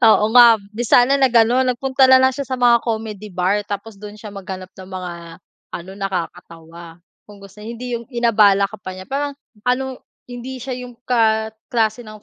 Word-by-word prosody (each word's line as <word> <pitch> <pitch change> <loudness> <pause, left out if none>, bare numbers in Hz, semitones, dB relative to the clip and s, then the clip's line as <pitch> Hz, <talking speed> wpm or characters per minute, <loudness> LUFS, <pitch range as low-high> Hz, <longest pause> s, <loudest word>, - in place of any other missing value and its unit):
Oo, 215 -1 +5
nga 235 -3 +7
di 235 +3 -4
sana 250 +5 +4
nag-ano 250 -1 +3
nagpunta 260 +2 +2
na 260 0 +6
lang 260 - +5
siya 275 0 -5
sa 260 - -3
mga 245 -2 +4
comedy 220 -3 -5
bar. 185 +1 0
Tapos 205 0 -6
dun 210 0 -10
siya 215 0 -10
maghanap 190 -2 -8
ng 185 - -10
mga, 185 -2 -6 0.6
ano, 175 +2 -7
nakakatawa, 170 -3 -7 0.2
kung 205 -1 -15
gusto 200 +1 -15
hindi 235 +2 -5
yung 235 - -13
inabala 215 -5 +3
ka 215 - -10
pa 185 -1 -8
niya. 185 0 -9
Parang 285 +1 -2 0.3
anong 260 +1 -1 0.3
hindi 250 +1 -7
siya 255 -1 -5
yung 250 -1 -9
ka 220 -3 +1 0.2
klase 230 -1 -1
ng 215 -1 -12
225 Hz, 180 wpm, -19 LUFS, 200-250 Hz, 0.6 s, nga